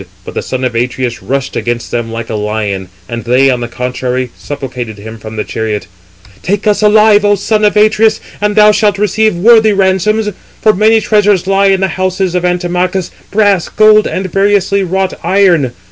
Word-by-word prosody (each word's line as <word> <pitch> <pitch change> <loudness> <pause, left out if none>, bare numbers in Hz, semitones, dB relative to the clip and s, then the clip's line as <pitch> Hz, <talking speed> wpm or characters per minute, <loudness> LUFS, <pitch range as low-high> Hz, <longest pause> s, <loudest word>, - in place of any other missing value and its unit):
But - - -8
the - - -3
son 130 0 -4
of 125 -2 -1
Atreus 120 +1 -2
rushed 135 0 -3
against 120 0 -3
them 120 -1 -3
like 115 0 -6
a - - -3
lion, 105 -3 -3 0.2
and 115 -1 -5
they, 130 +3 +3
on 125 - -1
the 120 - -4
contrary, 125 0 -3
supplicated 125 -6 -7
[him] 110 +2 -10
from 110 0 -9
the 105 - -2
chariot: 110 -2 -4 0.6
"Take 200 +3 -2
us 210 0 +1
alive, 210 0 +4
O 205 0 +3
son 215 +2 -1
of 210 0 +2
Atreus, 215 +1 +3 0.2
and 210 0 0
thou 210 0 +6
shalt 210 -1 +1
receive 210 0 +1
worthy 220 +3 +4
ransoms. 200 +3 +1 0.3
For 215 - +3
many 220 +3 +3
treasures 205 -4 +2
lie 195 +1 +2
in 195 -1 +2
the 190 - +1
houses 185 -1 -1
of 180 -1 -1
Antimachus, 180 +1 -1 0.2
brass, 200 -3 +1
gold, 215 0 +4
and 190 - -3
variously 200 0 +1
wrought 190 +1 -1
iron. 180 -9 +2
185 Hz, 185 wpm, -12 LUFS, 125-210 Hz, 0.6 s, thou